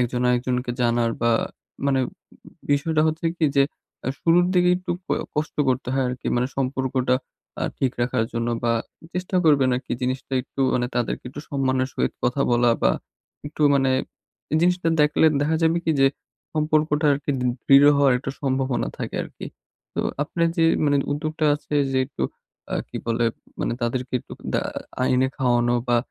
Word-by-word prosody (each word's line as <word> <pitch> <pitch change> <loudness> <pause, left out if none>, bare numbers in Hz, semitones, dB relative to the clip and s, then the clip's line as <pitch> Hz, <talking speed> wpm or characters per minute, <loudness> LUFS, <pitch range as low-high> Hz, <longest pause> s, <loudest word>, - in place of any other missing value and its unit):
একজন 120 0 0
আরেকজনকে 125 0 0
জানার 120 -1 +2
বা, 120 - +4 0.6
মানে 135 -1 +2 0.7
বিষয়টা 155 +2 +2
হচ্ছে 160 +1 -1
কি 165 - +1
যে, 140 - +7 0.4
আ - - -1
শুরুর 170 +1 +4
দিকে 180 0 +4
একটু 180 - -6 0.2
অ - - +4 0.2
কষ্ট 150 +1 -2
করতে 130 -1 0
হয় 135 -1 +1
আরকি। 125 0 -6
মানে 125 - +1
সম্পর্কটা 130 -1 0 0.5
আ - - +1
ঠিক 130 -2 +1
রাখার 120 -1 +1
জন্য 115 0 -1 0.2
বা 115 - +3 0.4
চেষ্টা 185 +1 -2
করবেন 140 -4 +5
আরকি 125 - -5
জিনিসটা 130 +1 -2
একটু 135 - -8
মানে 120 -1 +1
তাদেরকে 125 0 -1
একটু 135 +3 -8
সম্মানের 130 -2 0
সহিত - - -1
কথা 125 +3 +1
বলা 120 0 +4
বা, - - +5 0.6
একটু 150 +1 -4
মানে 135 -1 +3 0.7
জিনিসটা 180 -1 +2
দেখলে 150 +1 +4
দেখা 155 +2 +1
যাবে 165 +1 +3
কি 160 - +2
যে, 135 - +6 0.5
সম্পর্কটা 155 0 +2
আরকি 140 +1 -2
দ - - -1 0.2
দৃঢ় 140 +1 +7
হওয়ার 140 -2 +4
একটা 135 - -4
সম্ভাবনা 130 -2 0
থাকে - - -5
আরকি। - - -9 0.5
তো - - 0 0.2
আপনার 170 +3 0
যে, 165 - +3 0.2
মানে 145 -1 +3 0.2
উদ্যোগটা 155 +2 -2
আছে 150 0 -6 0.2
যে, 130 - +2
একটু 145 - -6 0.5
আ - - +1
কি - - -7
বলে 115 0 +1 0.4
মানে - - 0
তাদেরকে 125 +2 -2
একটু - - -14 0.2
দা - - +3 0.4
আইনে 130 0 +3
খাওয়ানো 120 -1 +2
বা 120 - +4
135 Hz, 170 wpm, -23 LUFS, 125-150 Hz, 0.7 s, যে